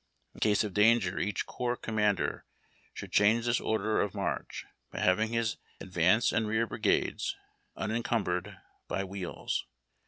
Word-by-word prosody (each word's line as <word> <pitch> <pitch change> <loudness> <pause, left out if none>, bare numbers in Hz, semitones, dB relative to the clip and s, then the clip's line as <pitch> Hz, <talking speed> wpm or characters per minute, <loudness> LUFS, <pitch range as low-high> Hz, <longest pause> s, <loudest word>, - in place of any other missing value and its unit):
In - - -14
case 105 0 +3
of 105 -3 -4
danger 105 -2 +4
each 105 -2 -1
corps 125 0 -2
commander 105 -4 0 0.5
should - - -8
cliange 110 +3 +4
this 120 0 +2
order 110 0 +1
of 105 - -2
march, - - -3 0.2
by - - -6
having 105 +4 +3
his 115 -1 0 0.2
advance 95 +5 +2
and 115 -1 +1
rear 110 +2 +1
brigades - - 0 0.4
unencumbered 105 -4 -1 0.3
by 95 - -1
wheels. 95 -2 -4
105 Hz, 135 wpm, -30 LUFS, 95-115 Hz, 0.5 s, danger